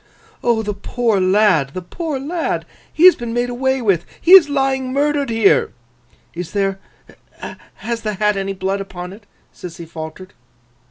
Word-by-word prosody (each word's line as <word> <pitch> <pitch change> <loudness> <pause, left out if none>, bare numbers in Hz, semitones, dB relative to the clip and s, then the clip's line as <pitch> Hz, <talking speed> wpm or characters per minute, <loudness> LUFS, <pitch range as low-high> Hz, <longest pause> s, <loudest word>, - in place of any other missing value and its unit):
'O 230 -2 +1
the 210 0 -3
poor 220 +1 -1
lad, 185 -7 +2
the 185 - -4
poor 305 - -4
lad! 320 +5 -3 0.3
He 330 - +3
has 370 - +9
been 235 -1 -5
made 245 0 -1
away 265 +1 -1
with. 190 -6 +2 0.2
He 345 - 0
is 370 -6 +9
lying 270 -2 0
murdered 285 0 0
here!' 225 -3 +2 0.6
'Is 175 0 -7
there—has 200 +3 -6
the 215 -1 -3
hat 210 +1 +1
any 195 0 -3
blood 195 +1 -2
upon 180 -2 -8
it?' 205 0 -16 0.3
Sissy 170 -1 -9
faltered. 160 +3 -9
215 Hz, 155 wpm, -18 LUFS, 190-265 Hz, 0.6 s, has